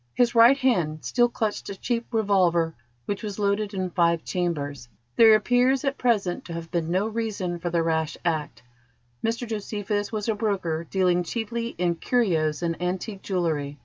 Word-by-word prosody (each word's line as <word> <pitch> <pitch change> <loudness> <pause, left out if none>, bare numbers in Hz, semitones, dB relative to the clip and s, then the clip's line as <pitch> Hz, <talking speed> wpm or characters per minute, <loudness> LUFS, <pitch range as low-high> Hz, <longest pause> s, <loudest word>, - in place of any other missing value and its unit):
His 240 -1 +3
right 235 +3 +7
hand 180 - 0
still 240 -1 +3
clutched 220 -3 -3
a 200 - -5
cheap 235 +2 -2
revolver 185 -7 +2 0.3
which 200 - -3
was 210 -3 -5
loaded 205 0 0
in 185 -1 -2
five 170 -2 +2
chambers. 145 -8 -3 0.3
There 225 -1 +8
appears 245 +5 +2
at 275 0 -1
present 205 -8 +1
to 170 - -7
have 165 0 -7
been 165 -2 -1
no 185 +4 +1
reason 215 -6 -3
for 175 +1 -3
the 170 -1 +1
rash 160 -1 -1
act. 150 -8 -2 0.6
Mr 230 +2 -1
Josephus 205 -1 -3
was 215 -1 -3
a 225 - +2
broker 190 -7 -2
dealing 180 -2 +2
chiefly 230 +5 -4
in 175 0 +1
curios 165 -6 0
and 165 0 -2
antique 190 +3 -3
jewellery. 155 -6 -2
190 Hz, 170 wpm, -25 LUFS, 170-225 Hz, 0.6 s, There